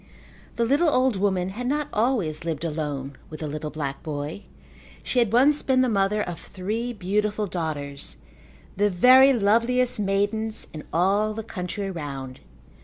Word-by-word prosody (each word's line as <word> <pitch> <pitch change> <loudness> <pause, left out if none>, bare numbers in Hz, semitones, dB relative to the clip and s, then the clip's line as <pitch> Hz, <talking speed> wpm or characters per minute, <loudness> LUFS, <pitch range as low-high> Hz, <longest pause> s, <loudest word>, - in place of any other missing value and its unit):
The 235 - +1
little 290 +7 +3
old 255 -4 +2
woman 190 -2 0
had 240 +6 -5
not 295 +2 0
always 210 - 0
lived 165 -1 -3
alone 145 -4 -3
with 155 0 -9
the 155 - -2
little 150 +1 -4
black 145 -3 -4
boy. 150 +3 -5 0.6
She 250 - 0
had 235 -4 +2
once 280 +5 +4
been 260 -1 +2
the 255 - +2
mother 210 0 +1
of 175 -2 -6
three 215 +6 -4
beautiful 210 +1 -1
daughters, 150 -6 -4 0.6
the 205 +1 +2
very 255 +8 +7
loveliest 235 +2 +2
maidens 205 +2 -1
in 155 - -8
all 200 +5 +2
the 225 - -4
country 195 -1 -4
round. 135 -6 -6
200 Hz, 155 wpm, -25 LUFS, 160-235 Hz, 0.6 s, very